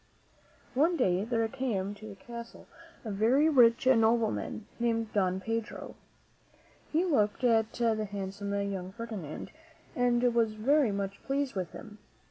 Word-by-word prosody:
One 325 Hz, +6 st, +3 dB
day 185 Hz, -, +2 dB
there 225 Hz, -1 st, 0 dB
came 220 Hz, -6 st, -2 dB
to 215 Hz, +1 st, -11 dB
the 200 Hz, -, -9 dB
castle 235 Hz, -1 st, -10 dB, 0.4 s
a 220 Hz, -, -3 dB
very 235 Hz, +9 st, +3 dB
rich 245 Hz, -4 st, +5 dB
nobleman, 225 Hz, -3 st, +2 dB
named 230 Hz, -2 st, 0 dB
Don 185 Hz, -2 st, +1 dB
Pedro. 225 Hz, +2 st, -4 dB, 1.0 s
He 330 Hz, +4 st, +2 dB
looked 235 Hz, -, +1 dB
at 225 Hz, -2 st, +3 dB
the 225 Hz, -3 st, +1 dB
handsome 200 Hz, 0 st, -5 dB, 0.2 s
young 185 Hz, -1 st, -5 dB
Ferdinand 210 Hz, -9 st, -6 dB, 0.4 s
and 245 Hz, 0 st, +2 dB
was 230 Hz, -2 st, +2 dB
very 260 Hz, +3 st, +3 dB
much 200 Hz, 0 st, -4 dB
pleased 275 Hz, 0 st, -1 dB
with 185 Hz, -3 st, -4 dB
him. 215 Hz, -1 st, -11 dB
225 Hz, 135 wpm, -30 LUFS, 205-245 Hz, 1.0 s, rich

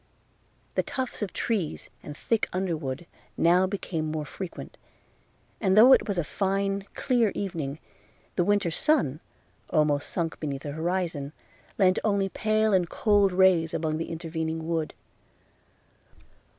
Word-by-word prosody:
The -, -, +2 dB
tufts 260 Hz, -3 st, -4 dB
of 205 Hz, -, -2 dB
trees 200 Hz, -9 st, -2 dB
and 145 Hz, 0 st, -9 dB
thick 225 Hz, -2 st, 0 dB
underwood 165 Hz, -6 st, -3 dB, 0.3 s
now 180 Hz, +3 st, +4 dB
became 170 Hz, -5 st, -3 dB
more 155 Hz, -1 st, -3 dB
frequent; 185 Hz, +3 st, -8 dB, 0.8 s
and 190 Hz, -2 st, +2 dB
though 245 Hz, +5 st, +9 dB
it -, -, +4 dB
was 200 Hz, -3 st, -1 dB
a 175 Hz, -, +1 dB
fine, 195 Hz, +3 st, -1 dB
clear 240 Hz, -6 st, +2 dB
evening, 160 Hz, -8 st, -3 dB, 0.6 s
the 175 Hz, -, +2 dB
winter 205 Hz, -2 st, +2 dB
sun, 160 Hz, -, +1 dB, 0.5 s
almost 150 Hz, -2 st, +1 dB
sunk 165 Hz, -2 st, -2 dB
beneath 140 Hz, -3 st, -4 dB
the 145 Hz, -, -4 dB
horizon, 160 Hz, -2 st, -2 dB, 0.4 s
lent 185 Hz, -2 st, +4 dB
only 200 Hz, -2 st, +1 dB
pale 215 Hz, +1 st, +1 dB
and 180 Hz, -3 st, +2 dB
cold 205 Hz, -3 st, +3 dB
rays 180 Hz, -3 st, +4 dB
among 155 Hz, -1 st, -1 dB
the 165 Hz, -, -4 dB
intervening 160 Hz, -1 st, -4 dB
wood. 165 Hz, -2 st, -2 dB
180 Hz, 135 wpm, -27 LUFS, 160-200 Hz, 0.8 s, though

